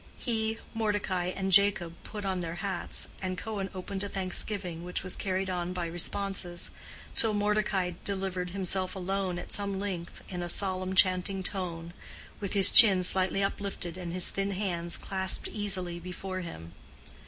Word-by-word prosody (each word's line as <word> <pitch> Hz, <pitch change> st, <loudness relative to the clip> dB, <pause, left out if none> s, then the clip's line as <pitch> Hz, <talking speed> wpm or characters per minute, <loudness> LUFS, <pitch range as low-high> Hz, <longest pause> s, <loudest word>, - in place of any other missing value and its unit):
He, 225 Hz, -2 st, -1 dB, 0.2 s
Mordecai 205 Hz, -5 st, 0 dB
and 190 Hz, +1 st, -2 dB
Jacob 195 Hz, -3 st, +4 dB
put 210 Hz, -2 st, -6 dB
on 190 Hz, -1 st, 0 dB
their 170 Hz, -1 st, -3 dB
hats, 190 Hz, -1 st, -3 dB
and 185 Hz, -1 st, -2 dB
Cohen 200 Hz, -1 st, -3 dB
opened 190 Hz, +1 st, -4 dB
a 200 Hz, -, -3 dB
thanksgiving, 185 Hz, -2 st, -2 dB
which 180 Hz, 0 st, -3 dB
was 185 Hz, -, 0 dB
carried 190 Hz, 0 st, -1 dB
on 180 Hz, -1 st, -2 dB
by 180 Hz, -2 st, -2 dB
responses, 175 Hz, +1 st, -2 dB, 0.4 s
till 220 Hz, -2 st, +3 dB
Mordecai 205 Hz, -3 st, +1 dB
delivered 190 Hz, -2 st, -2 dB
himself 185 Hz, 0 st, -1 dB
alone 190 Hz, -1 st, -1 dB
at 175 Hz, -, -7 dB
some 200 Hz, -1 st, 0 dB
length, 185 Hz, -4 st, -5 dB
in 180 Hz, -2 st, -4 dB
a 175 Hz, -, -3 dB
solemn 185 Hz, 0 st, 0 dB
chanting 185 Hz, 0 st, +3 dB
tone, 170 Hz, -3 st, -4 dB, 0.5 s
with 200 Hz, -2 st, -3 dB
his 195 Hz, -2 st, +7 dB
chin 195 Hz, -6 st, +9 dB
slightly 190 Hz, +2 st, +3 dB
uplifted 195 Hz, -3 st, -3 dB
and 180 Hz, -2 st, -5 dB
his 180 Hz, 0 st, +2 dB
thin 195 Hz, 0 st, -1 dB
hands 180 Hz, -4 st, -1 dB
clasped 190 Hz, -1 st, +2 dB
easily 185 Hz, -5 st, -2 dB
before 185 Hz, +2 st, -5 dB
him. 85 Hz, -, -7 dB
190 Hz, 155 wpm, -30 LUFS, 180-200 Hz, 0.5 s, chin